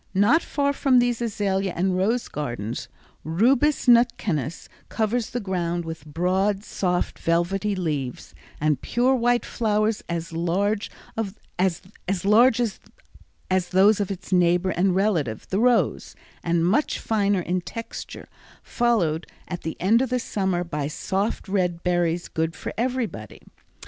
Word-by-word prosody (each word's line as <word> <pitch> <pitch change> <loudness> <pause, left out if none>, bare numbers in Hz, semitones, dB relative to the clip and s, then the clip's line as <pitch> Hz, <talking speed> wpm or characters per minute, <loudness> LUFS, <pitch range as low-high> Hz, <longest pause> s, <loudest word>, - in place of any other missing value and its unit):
Not 215 - +4
far 280 -3 0
from 270 -2 +3
these 245 -1 +2
azalea 195 -4 -1
and 185 +2 +1
rose 220 +6 +1
gardens, 120 -5 -4 0.4
Rubus 245 - +2
nutkanus 220 - +2 0.2
covers 225 +1 -1
the 245 - -3
ground 175 -4 -2
with 160 -2 -7
broad, 190 +6 0
soft, 180 -4 -2
velvety 190 +5 0
leaves, 150 -9 -3 0.3
and 150 -1 +1
pure 250 +2 +2
white 245 -1 +2
flowers 215 -1 0
as 170 -1 -4
large 195 +6 0 0.7
as 185 -2 +1 1.9
those 195 +3 +5
of 200 - -1
its 190 -1 -5
neighbor 180 +1 +3
and 180 +1 +1
relative, 170 - 0
the 190 - 0
rose, 245 0 +2 0.3
and 170 -1 +1
much 220 - +1
finer 205 -3 +1
in 180 +1 -1
texture, 230 +6 -8 0.4
followed 185 -10 0 0.2
at 175 -1 -5
the 160 - -5
end 220 +6 +4
of 255 -1 0
summer 190 -6 -1
by 150 -4 -3
soft 195 +9 -2
red 180 -3 -1
berries 175 -1 0
good 160 0 -2
for - - -6
everybody. 230 - -3
190 Hz, 130 wpm, -24 LUFS, 170-225 Hz, 1.9 s, those